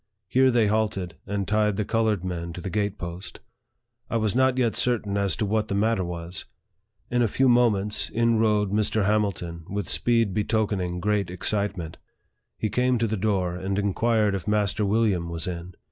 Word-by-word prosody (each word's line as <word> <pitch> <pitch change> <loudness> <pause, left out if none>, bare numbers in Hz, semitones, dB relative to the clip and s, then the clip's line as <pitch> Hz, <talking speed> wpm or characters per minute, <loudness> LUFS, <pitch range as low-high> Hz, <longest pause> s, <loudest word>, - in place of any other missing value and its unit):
Here 130 +5 +4
they 120 -3 +3
halted, 105 -4 -1
and 100 -1 -2
tied 105 -2 +1
the 105 - -1
colored 110 -5 0
men 85 -2 -4
to 90 - -7
the 95 - -5
gate 105 -1 -1
post. 85 +1 -7 0.7
I 115 - 0
was 110 -1 0
not 130 0 +3
yet 120 -3 +1
certain 110 -5 0
as 100 -4 +2
to 110 - -1
what 110 +1 0
the 100 - -2
matter 110 -1 +1
was. 85 +1 -5 0.7
In 120 0 +2
a 120 - +3
few 130 +5 +2
moments, 110 -5 +2
in 115 0 +2
rode 105 -3 +2
Mr. 105 0 +1
Hamilton, 100 -5 0
w.th 100 +2 -3
a - - -6
speed 115 -5 +2
betokening 100 -4 -1
great 105 -2 0
excitement. 90 -3 -2 0.6
He 110 - -1
came 125 +4 +1
to 115 - +1
the 110 0 -1
door, 95 -4 0
and 95 +2 -3
inquired 105 +1 +1
if 95 -4 -4
Master 105 0 +1
William 100 -5 +1
was 85 0 -4
in. 90 0 -6
105 Hz, 185 wpm, -25 LUFS, 95-110 Hz, 0.7 s, Here